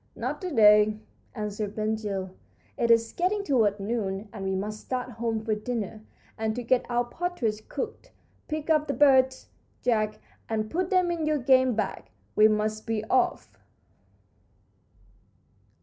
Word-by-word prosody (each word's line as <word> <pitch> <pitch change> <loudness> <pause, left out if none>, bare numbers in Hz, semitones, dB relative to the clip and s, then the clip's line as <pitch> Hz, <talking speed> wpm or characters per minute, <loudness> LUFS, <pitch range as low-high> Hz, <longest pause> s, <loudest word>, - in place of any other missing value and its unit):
"Not - - -4
to 370 - -3
day," 210 -5 +6 0.4
answered 210 -1 -4
Ben 215 0 0
Gile; 200 -4 -3 0.4
"it 235 - 0
is 230 -1 +4
getting 390 +4 0
toward 220 - +2
noon, 200 -1 -3
and 200 -3 -6
we 190 0 0
must 210 +3 -3
start 250 +1 -4
home 225 -1 -3
for 220 - +1
dinner 215 -1 -4 0.4
and 220 0 -1
to 245 - -4
get 250 +1 +1
our 240 0 +1
partridge 240 -7 -3
cooked. 455 -2 -5 0.4
Pick 310 0 -2
up 305 -1 +3
the 280 - -1
birds, 265 -2 +4 0.3
Jack, 215 -3 +1 0.3
and 215 -1 -2
put 360 +1 -1
them 365 -2 +2
in 325 -3 -2
your 305 -1 +2
game 260 -2 +4
bag. 215 - -2 0.3
We 215 0 +7
must 215 +1 -1
be 220 -1 -1
off." 255 -1 0
225 Hz, 150 wpm, -27 LUFS, 215-260 Hz, 0.4 s, We